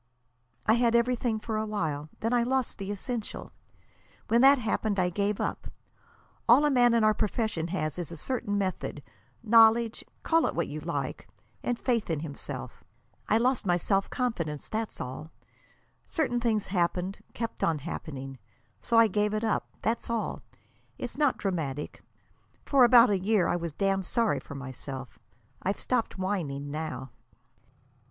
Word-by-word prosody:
"I 215 - +5
had 235 0 +3
everything 235 -1 +1
for 220 0 -3
a 215 - -1
while. 155 -8 -2
Then 225 +2 0
I 240 - +4
lost 255 0 -1
the 195 0 -5
essential. 215 +2 -4 0.8
When 235 +1 +4
that 275 +2 +8
happened 220 -3 -1
I 180 -1 +2
gave 200 +2 0
up. - - -3 0.8
All 260 +6 +7
a 295 - +3
man 245 -2 +5
in 230 - +3
our 215 0 +5
profession 210 -6 -1
has 160 -2 -2
is 175 -1 -4
a 170 - -7
certain 205 - -2
method, 185 -6 -3 0.4
knowledge 225 0 +5 0.2
call 330 0 +3
it - - -3
what - - 0
you - - -5
like, - - -4 0.3
and 245 - -1
faith 235 -6 0
in 160 -3 -1
himself. 150 -3 -7 0.5
I 215 - +5
lost 250 +2 +2
my 175 -3 +2
self 195 +3 0
confidence; 170 - -2
that's 220 0 -3
all. 130 +5 -6 0.8
Certain 265 -7 0
things 225 -3 +1
happened; 180 +1 -1 0.2
kept 230 0 -4
on 165 -2 +2
happening. 135 -2 -6 0.4
So 230 - +1
I 230 - +8
gave 210 +1 0
it 215 - -1
up. 220 - 0 0.2
That's 230 +2 -1
all. 230 -2 -2 0.6
It's 245 -2 -5
not 290 -2 +2
dramatic. 150 -7 -3 0.6
For 275 -3 +5
about 240 -1 +7
a 195 - +2
year 195 -2 +2
I - - +1
was 170 -1 -3
damned 195 +3 0
sorry 230 -3 +1
for 140 - -10
myself. 135 -3 -7 0.4
I've 195 +2 -1
stopped 240 -5 -1
whining 155 -8 -2
now." 145 -5 -5
210 Hz, 160 wpm, -28 LUFS, 170-235 Hz, 0.8 s, that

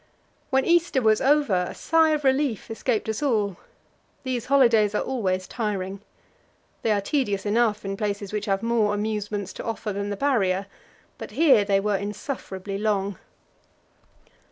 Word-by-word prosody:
When 265 -1 +2
Easter 340 -5 +3
was 220 -3 +3
over, 260 -11 +2
a - - -8
sigh 325 0 +3
of 305 -1 0
relief 265 -5 0
escaped 225 0 -1
us 220 +3 -2
all; 210 -9 0 0.7
these 255 -3 -3
holidays 230 -6 +4
are - - +1
always 185 -8 -1
tiring. 200 -4 -3 0.8
They - - 0
are 205 -2 +2
tedious 205 -4 -1
enough 215 -1 +1
in 195 0 -3
places 205 -1 -3
which 210 - -2
have 195 +1 0
more 225 -3 +2
amusements 210 -2 -3
to - - -7
offer 225 -2 -3
than 200 +1 -3
the 205 - -3
Barrier, 200 -8 +1 0.5
but - - -7
here 290 -10 +4
they 200 -1 +2
were 205 0 0
insufferably 200 -2 -5
long. 200 -3 -1
210 Hz, 155 wpm, -25 LUFS, 200-255 Hz, 0.8 s, holidays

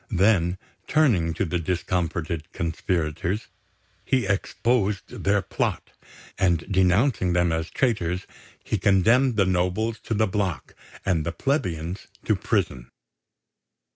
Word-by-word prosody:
Then, 95 -3 +3 0.3
turning 115 - +3
to 100 - 0
the 90 +1 -1
discomfited 85 -1 -2
conspirators, 85 +3 -2 0.6
he 130 -4 +1
exposed 100 +1 -1
their 100 0 +2
plot; - - -2 0.5
and, 85 -4 +2
denouncing 95 +1 +3
them 85 -1 +2
as 80 0 -2
traitors, 95 -8 0 0.4
he - - -1
condemned 115 +6 +4
the 100 -2 +3
nobles 95 +5 0
to 115 - -3
the 110 +1 +3
block 95 -4 -2 0.3
and 85 -5 +1
the 85 - -2
plebeians 90 - -2 0.2
to - - +3
prison. 60 -1 -1
95 Hz, 115 wpm, -25 LUFS, 85-105 Hz, 0.6 s, condemned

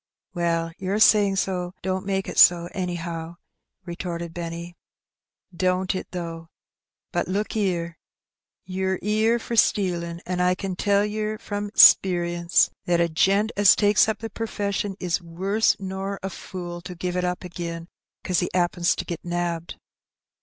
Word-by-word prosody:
"Well, 165 -1 -1
your 190 +2 -1
saying 205 -2 +5
so 180 -2 -2
don't 190 +1 -2
make 195 -1 -1
it - - -2
so, 175 -1 +6
anyhow,'* 170 -3 -4 0.5
retorted 170 -1 -5
Benny. 170 0 -6 0.4
" 180 - -28
Don't 185 +1 0
it, 185 - -5
though? 165 -2 -6 0.6
But - - -1
look 205 +4 -2
'ere: 170 -5 -1 0.7
ye're 190 0 -1
'ere 215 +3 +2
for 235 0 -5
stealin', 175 -6 +1
and 180 0 -2
I 180 0 +3
can 190 0 -4
tell 200 +2 +2
yer 215 0 -3
from 205 -1 -4
'sperience, 175 -2 +5
that 175 -1 +2
a 170 0 +2
gent 195 +7 +2
as 205 -1 +6
takes 210 +1 +4
up 220 - -1
the 225 -1 -5
perfession 205 -3 -3
is 180 -1 -1
worse 190 +6 +1
nor 195 +1 -4
a 195 - -3
fool 175 -2 -7
to 180 +1 -8
give 180 +1 -3
it 180 - 0
up 180 +1 -2
agin 170 -1 -6 0.4
'cause 180 -2 +1
he 175 - -1
'appens 175 -1 +1
to - - -4
get 170 - -6
nabbed." 175 -1 -3
180 Hz, 155 wpm, -24 LUFS, 170-200 Hz, 0.7 s, so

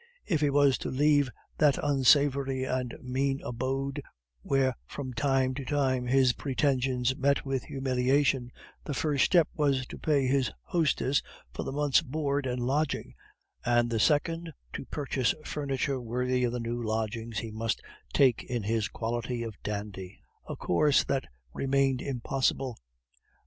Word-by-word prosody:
If 160 -6 0
he 145 - +3
was 140 -1 +4
to - - -4
leave 145 0 +3 0.3
that 150 -3 +4
unsavory 135 -1 +3
and 130 -2 -2
mean 135 +2 0
abode, 135 +3 -2 0.4
where 135 - +2
from 130 -3 -6
time 130 +1 +1
to 135 +1 -5
time 130 -3 0
his 130 0 +4
pretensions 130 -2 0
met 140 +1 +1
with 135 -2 -2
humiliation, 135 -1 +1 0.3
the 145 - -4
first 145 -4 +2
step 170 -3 +4
was 140 -4 +1
to - - -10
pay 145 -4 +2
his 130 0 +2
hostess 145 -5 +1 0.3
for - - -4
a - - -3
month's 145 +1 +3
board 145 -2 -1
and 125 -1 -2
lodging, 140 +4 -1 0.5
and 120 0 +2
the 115 - 0
second 165 +5 +1 0.2
to - - -5
purchase 135 -5 -1
furniture 140 -2 -2
worthy 125 +2 0
of 120 - -1
the 125 - -2
new 120 +1 -3
lodgings 110 0 -3
he 110 +2 -3
must 110 0 -2 0.3
take 130 -5 +3
in 120 -3 -3
his 110 +1 0
quality 120 0 -3
of 115 -1 -5
dandy, 100 -3 -5 0.3
a - - -3
course 145 - +3
that 135 -1 -1 0.3
remained 135 -1 +1
impossible. 130 -1 -1
130 Hz, 150 wpm, -29 LUFS, 125-140 Hz, 0.5 s, was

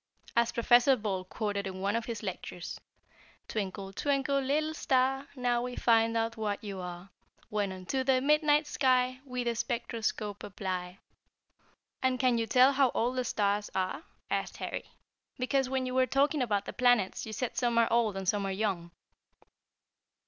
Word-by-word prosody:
As 235 0 +3
Professor 240 +3 +5
Ball 205 -5 -2
quoted 200 0 -3
in 190 0 -6
one 200 +3 0
of 230 -1 -1
his 230 -2 -5
lectures: 180 -2 -6 0.7
"'Twinkle, 195 -2 -4
twinkle, 275 +2 +1
little 305 +4 0
star, 270 -1 +1
Now 245 -2 +1
we 250 0 -4
find 230 -1 +3
out 230 0 -1
what 210 -2 -2
you 200 -2 -5
are, 180 +1 -8 0.4
When 205 -2 -1
unto 190 +8 -2
the 260 -1 +3
midnight 300 +2 +3
sky 255 -2 +2
We 250 -2 -3
the 235 -1 -1
spectroscope 225 -3 -2
apply.'" 185 -2 -4 1.0
"And 260 -1 +1
can 250 -3 +3
you 225 - -1
tell 255 +4 +6
how 270 -1 +4
old 245 +3 +1
the 255 - +1
stars 205 -3 0
are?" 185 - -1 0.3
asked - - -2
Harry; - - -4 0.5
"because 255 +1 +1
when 260 -1 0
you 255 - -3
were 260 0 +3
talking 280 +2 +2
about 210 -5 0
the - - -6
planets 245 -6 +2
you - - -6
said 235 +3 -3
some 240 -2 +1
are 230 -1 +5
old 225 -4 +2
and 190 -1 -5
some 200 0 +1
are - - -2
young." 190 -4 -2
235 Hz, 170 wpm, -30 LUFS, 200-255 Hz, 1.0 s, tell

